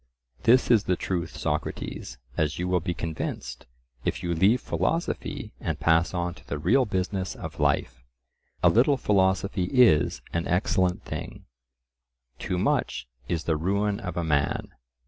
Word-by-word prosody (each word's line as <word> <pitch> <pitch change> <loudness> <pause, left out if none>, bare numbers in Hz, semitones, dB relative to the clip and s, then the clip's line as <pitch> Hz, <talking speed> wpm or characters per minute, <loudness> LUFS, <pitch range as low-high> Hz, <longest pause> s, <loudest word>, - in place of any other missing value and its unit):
This 125 +2 +5
is 110 -4 +5
the 90 - +2
truth, 90 -2 -3
Socrates, - - -3 0.2
as 75 -1 0
you 90 - -2
will 90 0 +2
be 85 +1 -3
convinced, 65 -7 -5 0.4
if - - -2
you 85 -1 0
leave 100 +9 +4
philosophy 165 +6 -2
and - - -3
pass 85 +1 +3
on 90 -1 -2
to - - -18
the 70 - -3
real 115 - +3
business 95 -2 -2
of - - -8
life. 60 -1 0 0.6
A - - +7
little 135 +5 +4
philosophy 95 -3 +1
is 95 - +4
an 85 0 -1
excellent 90 0 +1
thing; - - -7 0.9
too 90 - -2
much 90 - 0 0.2
is 85 -2 -1
the 80 - +1
ruin 100 +5 0
of 90 -2 -5
a 85 - 0
man. 70 -3 0
90 Hz, 150 wpm, -26 LUFS, 80-100 Hz, 0.9 s, A